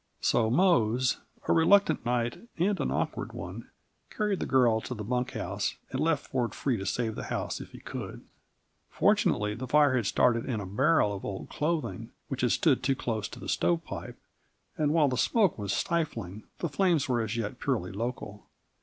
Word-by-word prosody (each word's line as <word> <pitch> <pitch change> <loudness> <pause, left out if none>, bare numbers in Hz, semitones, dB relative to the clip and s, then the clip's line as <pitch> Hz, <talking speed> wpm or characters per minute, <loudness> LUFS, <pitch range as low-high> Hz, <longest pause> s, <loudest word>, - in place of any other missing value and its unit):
So 110 -2 +2
Mose, 130 - +3 0.3
a - - +4
reluctant 165 0 +4
knight 120 - -2
and 190 +4 +1
an - - 0
awkward - - -2
one, - - -7 0.4
carried 210 -3 -1
the - - -2
girl 120 -4 +4
to 125 - -5
the 105 - -5
bunk 125 +3 -1
house, 100 +3 -2 0.2
and 130 - -2
left 155 -2 +1
Ford 120 -5 -2
free 135 -3 0
to 95 -1 -5
save 115 +2 -1
the - - -6
house - - -3
if - - -9
he - - -11
could. - - -7 0.6
Fortunately 105 0 +2
the 125 +4 -6
fire 145 0 +4
had 120 -5 +1
started 115 +2 +2
in 120 -5 -1
a 100 - -5
barrel 115 - +2
of 100 - -6
old 95 -2 -5
clothing 150 -7 -2 0.2
which 135 -1 -3
had 125 - +2
stood 145 -6 +3
too 135 +1 +1
close 110 -4 -2
to - - -11
the - - -8
stovepipe, 85 0 -1 0.6
and 150 -2 +1
while 155 -2 +4
the 130 -2 -1
smoke 200 - +2
was 100 -1 -2
stifling, 115 - -2
the 170 - -2
flames 165 -3 +2
were 120 -3 +1
as 110 +1 -3
yet 115 +2 -3
purely 115 -10 -1
local. 105 -1 -5
125 Hz, 190 wpm, -29 LUFS, 110-150 Hz, 0.6 s, a